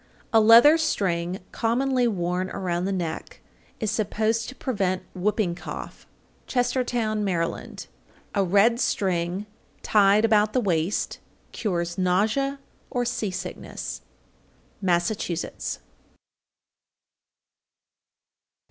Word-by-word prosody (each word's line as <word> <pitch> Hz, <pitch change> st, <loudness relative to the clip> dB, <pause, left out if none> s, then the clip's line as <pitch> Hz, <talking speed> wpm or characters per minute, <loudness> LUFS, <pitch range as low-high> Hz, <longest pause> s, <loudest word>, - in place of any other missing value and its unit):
_ -, -, -32 dB, 0.3 s
814. 225 Hz, -, +7 dB
A -, -, +2 dB
leather 240 Hz, +8 st, +9 dB
string 180 Hz, -, 0 dB
commonly 250 Hz, +2 st, +1 dB
worn 180 Hz, -3 st, -1 dB
around 180 Hz, -2 st, -2 dB
the 195 Hz, -, -1 dB
neck 170 Hz, -4 st, -4 dB, 0.4 s
is 220 Hz, -3 st, -1 dB
supposed 220 Hz, +1 st, 0 dB
to 260 Hz, -, -10 dB
prevent 190 Hz, -9 st, -1 dB
whooping 195 Hz, 0 st, 0 dB
cough. 175 Hz, -, -8 dB, 0.4 s
Chestertown, 245 Hz, -4 st, 0 dB
Md. 170 Hz, -4 st, -2 dB
815. -, -, -28 dB, 0.5 s
A 200 Hz, -, +2 dB
red 205 Hz, +6 st, +4 dB
string 185 Hz, -2 st, 0 dB, 0.4 s
tied 205 Hz, +1 st, +4 dB
about 215 Hz, -1 st, +3 dB
the 255 Hz, -, +3 dB
waist 180 Hz, -3 st, -1 dB, 0.3 s
cures 175 Hz, -4 st, -2 dB
nausea 215 Hz, +10 st, +1 dB, 0.3 s
or 245 Hz, -1 st, -1 dB
sea 235 Hz, -3 st, -1 dB
sickness. 185 Hz, +1 st, -6 dB, 0.8 s
_Massachusetts. 175 Hz, -1 st, -1 dB
205 Hz, 105 wpm, -25 LUFS, 180-230 Hz, 0.8 s, leather